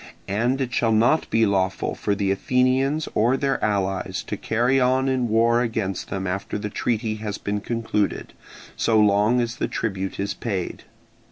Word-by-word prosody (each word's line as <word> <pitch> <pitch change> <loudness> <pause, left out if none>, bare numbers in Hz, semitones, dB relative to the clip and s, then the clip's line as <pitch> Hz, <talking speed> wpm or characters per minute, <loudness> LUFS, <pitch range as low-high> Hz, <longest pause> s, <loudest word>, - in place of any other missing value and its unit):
And 120 +7 0
it 130 -2 -2
shall 115 -2 +2
not 120 +8 +3
be 115 0 +3
lawful 95 -2 0
for 100 - -1
the 100 -1 0
Athenians 130 +7 +1
or 120 +5 +2
their 135 0 -1
allies 95 -3 -1
to - - -4
carry 120 +4 +1
on 130 0 +2
war 115 +2 +3
against 110 -5 -2
them 95 -1 -3
after 95 +3 -3
the 105 0 -5
treaty 110 -1 -1
has 105 -1 -4
been 105 0 -2
concluded, 110 -2 -2 0.4
so 110 -1 +2
long 105 +3 +4
as 120 0 -2
the - - -1
tribute 95 -4 -3
is 100 0 -1
paid. 95 -7 -4
110 Hz, 165 wpm, -23 LUFS, 100-125 Hz, 0.4 s, long